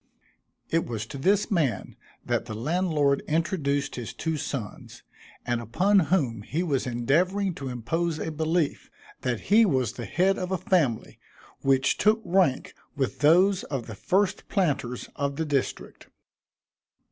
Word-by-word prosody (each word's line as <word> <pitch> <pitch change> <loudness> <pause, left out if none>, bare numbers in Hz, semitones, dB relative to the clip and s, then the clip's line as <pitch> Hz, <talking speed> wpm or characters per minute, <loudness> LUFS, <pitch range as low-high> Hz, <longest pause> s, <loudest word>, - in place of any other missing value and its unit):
It 165 0 +1
was 110 -3 -4
to 125 +4 -8
this 200 +9 +2
man 140 - 0 0.3
that - - -1
the 110 - -6
landlord 150 - +1
introduced 150 -3 0
his 120 -3 -6
two 160 -1 -2
sons, 135 -7 -6 0.4
and 120 -1 -1
upon 185 - +3
whom 130 - +1
he 155 - -2
was 140 -7 -1
endeavoring 175 +11 +1
to 135 - -3
impose 155 +8 -2
a 160 - -3
belief, 160 0 -1 0.3
that 125 -3 -1
he 225 +2 +8
was 130 - +1
the 120 -2 -6
head 190 +3 +1
of 185 0 -4
a 190 - +1
family 165 - 0 0.4
which 135 -1 +2
took 215 +2 +4
rank 175 -8 +1 0.2
with 135 -2 -2
those 180 +6 +4
of 135 -5 -4
the 110 - -8
first 190 - 0
planters 140 - -1
of 140 0 -2
the 160 - -2
district. 140 -3 -3
150 Hz, 145 wpm, -26 LUFS, 125-180 Hz, 0.4 s, he